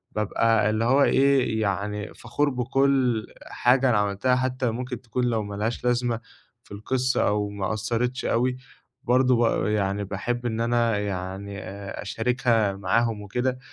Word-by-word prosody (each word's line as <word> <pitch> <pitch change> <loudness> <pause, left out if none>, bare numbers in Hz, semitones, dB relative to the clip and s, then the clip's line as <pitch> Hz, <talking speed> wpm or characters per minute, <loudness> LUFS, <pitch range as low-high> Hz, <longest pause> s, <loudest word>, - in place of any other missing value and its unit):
بابقى 110 +1 +2
اللي 110 +1 0
هو 135 +3 +4
إيه، 135 -5 +3
يعني 105 +1 -2
فخور 145 +5 -1
بكُلّ 130 -2 +1 0.2
حاجة 125 +1 +2
أنا 110 - +3
عملتها، 105 +5 +1
حتى 130 0 -1
لو 115 - 0
ممكن 125 0 -5
تكون 125 +1 -3
لو 115 -3 0
ما 100 0 -6
لهاش 110 +4 -2
لازمة 120 -1 +1 0.4
في - - -24
القصّة 125 +5 0
أو 105 0 0
ما 100 0 -3
أثرِّتش 120 +4 -2
أوي، 125 +2 +1 0.5
برضه 130 0 +3
ب 115 -1 +1
يعني 100 -1 0
باحب 120 +5 -3
إن 115 0 -2
أنا 115 -2 +1
يعني 100 0 -4
آآ، 100 +1 -7
أشاركها 115 -1 +1
معاهم 105 +3 0
وكده، 125 +5 -2
115 Hz, 155 wpm, -25 LUFS, 105-125 Hz, 0.5 s, هو